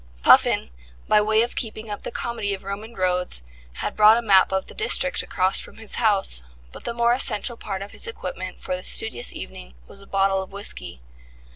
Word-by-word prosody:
Puffin, - - +5 0.4
by 210 0 +5
way 220 +1 +3
of 240 - -4
keeping 220 -1 -4
up 205 - -5
the - - -5
comedy 220 -4 -2
of 190 - -14
Roman 205 +4 -7
roads, 180 - -1 0.3
had - - -4
brought 215 +1 +7
a - - 0
map 195 -4 +5
of 190 0 -1
the - - -9
district 465 +3 +2
across 185 +1 0
from - - -9
his 220 -2 -7
house, 200 - +2 0.3
but - - -11
the 235 - -2
more 235 0 +3
essential 240 -1 0
part 195 -4 -5
of 200 - -11
his - - -5
equipment 465 +1 -6
for 185 - -3
this 180 - -2
studious 220 - +2
evening - - -9
was 200 - -12
a 195 - -16
bottle 195 0 +1
of 190 - -9
whisky. 200 - -6
205 Hz, 205 wpm, -23 LUFS, 190-225 Hz, 0.4 s, brought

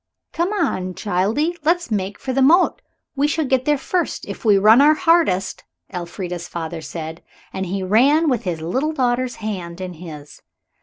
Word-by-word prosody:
"Come 345 +4 0
on, 185 - -1
childie, 220 - 0
let's 340 -4 +1
make 200 -1 -2
for 260 - -4
the 270 - +1
moat. 340 - +4 0.3
We 285 +1 +2
shall 310 +1 0
get 260 -1 +1
there 295 -1 +2
first, 350 +6 -2
if - - -7
we 210 -3 +5
run 215 +6 +6
our 300 +2 +6
hardest," 310 - +1 0.3
Elfrida's 175 0 -5
father 165 -1 -5
said. 160 0 -7 0.3
And 190 0 -3
he 190 +2 -3
ran, 270 - +4
with 250 -6 +1
his 170 -4 -4
little 260 - -1
daughter's 250 -2 0
hand 180 -5 -5
in 185 -1 -5
his. 155 -4 -11
215 Hz, 170 wpm, -20 LUFS, 180-295 Hz, 0.3 s, run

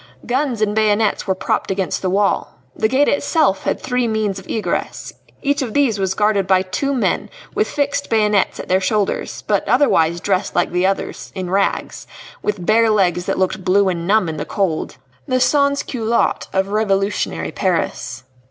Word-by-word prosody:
Guns 255 -3 0
and 210 -1 0
bayonets 215 -1 +1
were 190 - +1
propped - - -1
against 190 -2 -1
the 185 - 0
wall. 200 +2 0 0.2
The 220 - +1
gate 270 +5 +2
itself 285 - +1
had - - 0
three 250 -1 -1
means 215 -3 -1
of 190 - -15
egress; 220 - -3 0.3
each 285 0 +1
of 240 -5 -4
these 260 -8 +2
was 190 -1 0
guarded 210 -2 +2
by 190 -1 +4
two 190 +10 -2
men 250 - 0 0.2
with - - 0
fixed 285 -1 -1
bayonets 210 -3 +2
at - - -6
their 185 +1 +2
shoulders, 200 +1 -1
but 205 -2 0
otherwise 170 - +3
dressed 190 +1 -1
like 175 - +1
the 180 +2 +2
others, 195 - -3
in 185 -2 -4
rags 195 +1 -1 0.3
with 200 -4 -2
bare 225 +2 +4
legs 180 -4 +1
that - - 0
looked 185 0 -1
blue 195 +1 +3
and 170 -2 -3
numb 210 -2 +3
in 160 -1 -4
the - - -3
cold 185 -6 -2 0.3
the 255 - +1
sans 280 +2 +2
culottes 235 -2 0
of 190 +1 0
revolutionary 200 -1 0
Paris. 165 -8 -2
205 Hz, 180 wpm, -19 LUFS, 190-230 Hz, 0.3 s, by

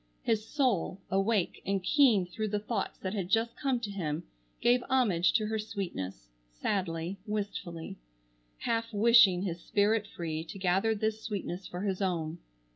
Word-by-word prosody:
His 220 -2 +1
soul, 225 - 0
awake 195 0 +1
and 195 -1 -1
keen 225 -3 +5
through 215 +5 -3
the 210 0 0
thoughts 210 -1 -3
that 190 0 -4
had 190 -4 -2
just 225 +2 +2
come 265 -3 0
to 210 -3 -3
him, 165 -4 -3 0.4
gave 245 +1 +4
homage 215 -10 +3
to 220 -2 +2
her 220 +1 -1
sweetness, 170 - -5 0.2
sadly, 170 - -2
wistfully, 200 -5 -4 0.6
half 230 - -1
wishing 210 -4 +6
his 175 -3 -3
spirit 210 +2 +2
free 160 -4 -4
to 170 - -8
gather 195 +4 +2
this 220 +1 -1
sweetness 195 -4 -4
for 180 - -6
his 195 -1 -1
own. 170 -3 -1
200 Hz, 155 wpm, -30 LUFS, 180-220 Hz, 0.6 s, wishing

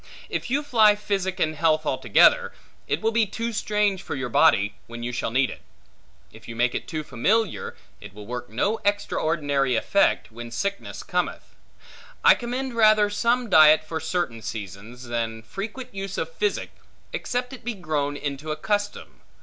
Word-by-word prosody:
If - - -3
you 285 +4 +1
fly 220 -7 +5
physic 195 -3 -2
in 155 - +1
health 155 0 +1
altogether, 130 -2 +4 0.3
it 145 - -1
will 225 - +1
be 225 -1 +2
too 230 +3 -4
strange 210 -2 0
for 170 - -5
your 130 -2 -3
body, 100 -2 +4
when 120 0 -8
you 120 - -2
shall 125 - -2
need 130 +3 +1
it. - - -10 0.7
If - - -15
you 115 - -7
make 120 +1 +1
it - - -4
too 155 -2 -4
familiar, 210 - 0 0.2
it - - -11
will 105 +1 -11
work 120 +2 -6
no 200 - 0
extraordinary 150 -9 0
effect, 195 - +2
when 120 +1 -8
sickness 200 +12 -4
cometh. - - -3 0.7
I - - +9
commend 255 +2 -4
rather 215 -2 +4
some 235 +4 +1
diet 155 -4 +7
for 160 +1 -4
certain 160 -8 -2
seasons, 110 +4 -7
than 115 -2 -3
frequent 210 - -7
use 195 0 -5
of - - -3
physic, 420 -4 -1 0.4
except 250 +1 -3
it 260 - -10
be 240 0 -3
grown 150 -5 -2
into 145 +1 -5
a - - -1
custom. 205 +5 -3
160 Hz, 170 wpm, -24 LUFS, -, 0.7 s, I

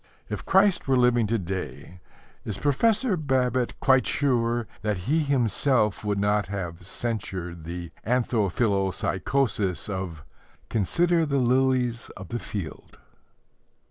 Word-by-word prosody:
If - - -5
Christ 190 -3 +4
were 135 -1 +3
living 120 -2 +3
to 115 +2 +1
day, 90 - -6 0.4
is 105 -3 -4
Professor 215 - +2
Babbitt 130 -5 0
quite 130 -1 +4
sure 120 -4 +1 0.2
that 105 -4 -2
he 155 +6 +2
himself 130 -6 +1
would 105 -1 0
not 105 +1 +1
have 90 -3 -5
censured 95 -8 -4
the 85 0 -6
anthophilpsychosis 105 -1 0
of 95 -6 -4 0.5
"Consider 165 - +2
the 140 -1 +1
lilies 125 -2 +1
of 95 -2 -9
the 120 - -3
field"? 95 -9 -7
115 Hz, 115 wpm, -26 LUFS, 95-130 Hz, 0.5 s, Christ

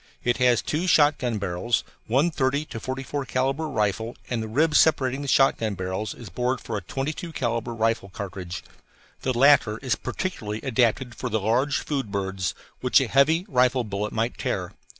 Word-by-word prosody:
It 120 0 +1
has 125 -2 +3
two 165 +5 -1
shotgun 145 -8 +3
barrels, 100 +4 -1 0.2
one 140 +9 +2
30 140 0 0
to 115 - -7
44 135 +3 -4
calibre 135 +5 0
rifle 110 -2 -1 0.2
and 120 -2 0
the 110 - -4
rib 150 +8 +2
separating 140 -4 +3
the 140 - -5
shotgun 115 -6 +3
barrels 95 +3 -3
is 120 - -10
bored 125 +5 -1
for - - -5
a 100 - -2
22 145 - -4
calibre 120 -4 -2
rifle 115 -2 0
cartridge. 95 -2 -6 0.6
The 130 -2 -1
latter 130 -5 +5
is 130 - +1
particularly 110 - -4
adapted 125 -1 +1
for 125 +2 -4
the 110 -1 0
large 120 +7 +1
food 135 -8 -3
birds, 95 -3 -2 0.2
which 125 - +4
a 135 - 0
heavy 155 +8 +3
rifle 125 -4 +3
bullet 105 -1 -3
might 115 +2 -2
tear. - - -2
125 Hz, 170 wpm, -25 LUFS, 110-135 Hz, 0.6 s, latter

